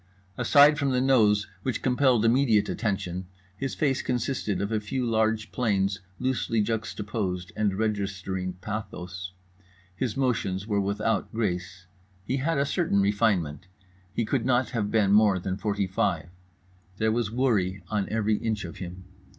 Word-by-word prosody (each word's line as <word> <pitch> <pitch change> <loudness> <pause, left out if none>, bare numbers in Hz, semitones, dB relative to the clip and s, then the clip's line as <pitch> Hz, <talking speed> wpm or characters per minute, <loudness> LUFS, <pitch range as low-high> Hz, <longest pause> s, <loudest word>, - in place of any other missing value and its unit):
Aside 145 - +6
from 140 -2 +1
the 125 -1 +2
nose 110 -6 +4 0.2
which 130 +3 -2
compelled 125 -3 +3
immediate 115 -3 +4
attention, 95 -4 -2 0.3
his 135 +6 -3
face 135 -4 +1
consisted 125 -5 -1
of 100 +2 -2
a 110 - +1
few 125 +5 -2
large 110 -1 +1
planes 100 -4 0 0.2
loosely 130 -3 0
juxtaposed 105 -4 -2
and 105 -3 +1
registering 95 -3 -2
pathos. 95 -4 -6 0.6
His 120 +3 -2
motions 105 -8 0
were 105 -2 +1
without 100 +3 -1
grace. 90 -4 -3 0.4
He 130 +5 -1
had 155 +4 0
a 140 - +2
certain 155 - +1
refinement. 100 -5 +1 0.4
He 115 +4 -1
could 130 +1 0
not 125 0 +1
have 110 -4 -1
been 105 -3 +3
more 105 -2 +5
than 95 +1 -3
forty 100 0 -1
five. 95 -2 -1 0.7
There 110 +1 +2
was 115 -1 0
worry 105 -7 0
on 105 -2 -1
every 110 -1 +1
inch 110 -4 -2
of 85 - -8
him. 90 0 -7
105 Hz, 150 wpm, -27 LUFS, 95-120 Hz, 0.7 s, Aside